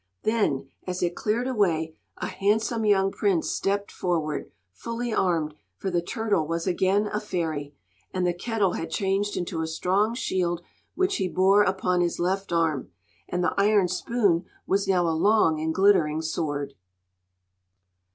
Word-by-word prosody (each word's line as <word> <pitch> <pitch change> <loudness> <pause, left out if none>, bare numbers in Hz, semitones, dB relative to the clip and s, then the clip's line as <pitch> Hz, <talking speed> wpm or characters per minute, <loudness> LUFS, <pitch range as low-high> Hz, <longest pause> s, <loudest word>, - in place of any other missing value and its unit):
Then, 205 -12 +1 0.2
as 180 0 -2
it 175 0 0
cleared 230 +4 -1
away, 165 -10 0 0.2
a - - -3
handsome 220 +3 0
young 195 -2 +3
prince 195 -6 0
stepped 200 +1 -1
forward, 160 -4 -2 0.2
fully 230 - -4
armed; 165 -7 +1 0.2
for 190 - -3
the 175 -1 +1
turtle 200 -3 -1
was 165 +1 -2
again 190 +3 +2
a 210 - +1
fairy, 160 -8 -3 0.4
and 185 -1 -1
the 175 - +2
kettle 200 0 0
had 165 - -4
changed 195 +2 0
into 175 -2 -2
a 160 - -2
strong 195 +7 +1
shield 175 -8 -1 0.3
which 375 +1 +1
he 190 - 0
bore 190 +3 +4
upon 185 -2 +1
his 175 -1 0
left 190 +2 -1
arm, 160 -7 0 0.4
and 180 0 -1
the - - +1
iron 205 -2 +4
spoon 185 -1 +1 0.2
was 195 +1 +1
now 180 -3 +3
a - - +2
long 165 -2 +3
and 160 0 -1
glittering 175 -6 +3
sword. 145 -3 -2
185 Hz, 155 wpm, -26 LUFS, 165-205 Hz, 0.4 s, bore